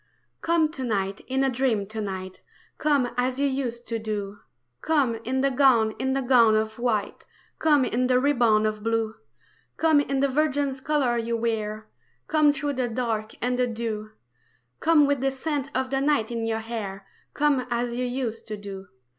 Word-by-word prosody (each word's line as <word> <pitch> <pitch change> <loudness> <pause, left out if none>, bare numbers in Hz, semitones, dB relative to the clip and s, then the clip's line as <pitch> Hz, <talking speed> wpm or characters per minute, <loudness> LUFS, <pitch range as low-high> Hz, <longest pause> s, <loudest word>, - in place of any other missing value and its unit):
COME 330 -2 +2
to 265 -4 -6
night 200 -4 -1
in 265 +1 0
a 270 - +3
dream 240 -5 0
to 215 +2 -6
night, 190 -2 -6 0.4
Come 285 -5 +2
as 255 +1 0
you 285 - +2
used 250 -3 -3
to 230 -1 -1
do, 205 -2 -4 0.4
Come 275 -8 +1
in 260 +3 -1
the 275 0 +2
gown, 250 -5 +4
in 265 0 0
the 270 0 0
gown 240 -4 +5
of 220 +1 -1
white, 225 -4 -1 0.3
Come 295 -4 +4
in 250 +1 0
the 250 0 +3
ribbon 240 -6 +3
of 215 -1 -2
blue; 225 0 0 0.6
Come 320 -2 +4
in 275 -1 0
the 280 - +3
virgin's 280 -1 0
colours 260 -5 +1
you 235 0 0
wear, 215 -2 -2 0.4
Come 305 -2 +4
through 290 0 -2
the 255 -2 -1
dark 225 -2 -2
and 250 0 0
the 250 - +3
dew, 220 -2 -4 0.7
Come 315 -3 +5
with 280 -2 0
the 270 - +2
scent 280 0 -3
of 260 0 -1
the 270 0 +1
night 275 -6 +1
in 230 -1 -2
your 225 0 -1
hair, 205 -4 -6 0.3
Come 285 -4 +2
as 240 0 -1
you 250 +1 -2
used 245 -3 -3
to 215 -1 -5
do. 195 -1 -8
245 Hz, 185 wpm, -25 LUFS, 220-270 Hz, 0.7 s, gown